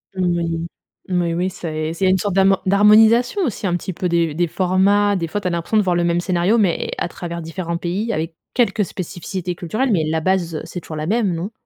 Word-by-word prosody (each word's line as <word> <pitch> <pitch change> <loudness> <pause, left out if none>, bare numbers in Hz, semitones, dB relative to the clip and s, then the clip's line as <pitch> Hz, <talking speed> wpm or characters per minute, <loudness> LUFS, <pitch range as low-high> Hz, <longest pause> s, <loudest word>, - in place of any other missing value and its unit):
Mmh 180 -2 +1
oui, 165 0 -2 0.5
oui, 170 -1 0
oui, 180 +2 0
c'est 155 -2 -4
c'est 190 +2 +1
une 190 - +4
sorte 195 0 -2
d'hamo 195 0 +4
d'harmonisation 220 - +5
aussi, 215 -4 -3
un 175 - 0
petit 180 +1 -4
peu, 180 - -2
des 170 -3 +1
des 175 +2 0
formats. 195 +4 +2
Des 170 -3 -2
fois, 205 - -3
tu 185 - -2
as - - +1
l'impression 170 +5 -1
de 215 - +5
voir 180 -2 +1
le 175 - +1
même 170 0 +1
scénario, 185 +4 +1
mais 190 -6 +1
à - - -1
travers 170 0 -6
différents 170 +1 -4
pays 190 +7 -2
avec 160 -2 -3 0.2
quelques 225 -4 +2
spécificités 180 0 -5
culturelles. 215 +10 -1
Mais 175 -6 +2
la 160 0 0
base, 175 -2 0
heu, - - -3
c'est 180 - -7
toujours 155 - -8
la 155 +1 -3
même, 210 -4 +1
non? 175 +6 -4
180 Hz, 230 wpm, -20 LUFS, 170-200 Hz, 0.5 s, d'harmonisation